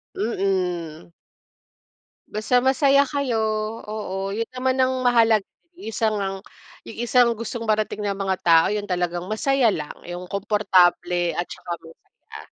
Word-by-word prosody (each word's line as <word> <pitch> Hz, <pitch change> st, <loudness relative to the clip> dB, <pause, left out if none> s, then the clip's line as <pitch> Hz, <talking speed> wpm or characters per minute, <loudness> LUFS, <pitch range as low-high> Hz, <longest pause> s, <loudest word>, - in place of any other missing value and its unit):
Mm. 180 Hz, -6 st, -2 dB, 1.2 s
Basta 215 Hz, +4 st, 0 dB
masaya 275 Hz, +2 st, +4 dB
kayo, 275 Hz, -4 st, -2 dB, 0.5 s
oo. 195 Hz, -2 st, -4 dB
Yun 230 Hz, +1 st, -3 dB
naman 255 Hz, 0 st, -1 dB
ang 255 Hz, -1 st, 0 dB
mahalaga, 225 Hz, -4 st, +4 dB, 0.3 s
yung -, -, -11 dB
isa 220 Hz, 0 st, +1 dB
ngang 195 Hz, -2 st, -2 dB, 0.5 s
yung 225 Hz, -, -9 dB
isang 240 Hz, 0 st, +4 dB
gustong 230 Hz, 0 st, -5 dB
marating 215 Hz, 0 st, 0 dB
ng 200 Hz, -1 st, -1 dB
mga 190 Hz, -1 st, -1 dB
tao 165 Hz, -1 st, +5 dB
yun 205 Hz, -1 st, -2 dB
talagang 175 Hz, 0 st, -2 dB
masaya 260 Hz, +3 st, +2 dB
lang, 150 Hz, -1 st, -5 dB, 0.2 s
yung 175 Hz, +1 st, -6 dB
komportable 180 Hz, -4 st, +2 dB
at 175 Hz, -, -1 dB
saka 175 Hz, -, -9 dB
masaya. 165 Hz, 0 st, -14 dB
210 Hz, 135 wpm, -23 LUFS, 180-235 Hz, 1.2 s, tao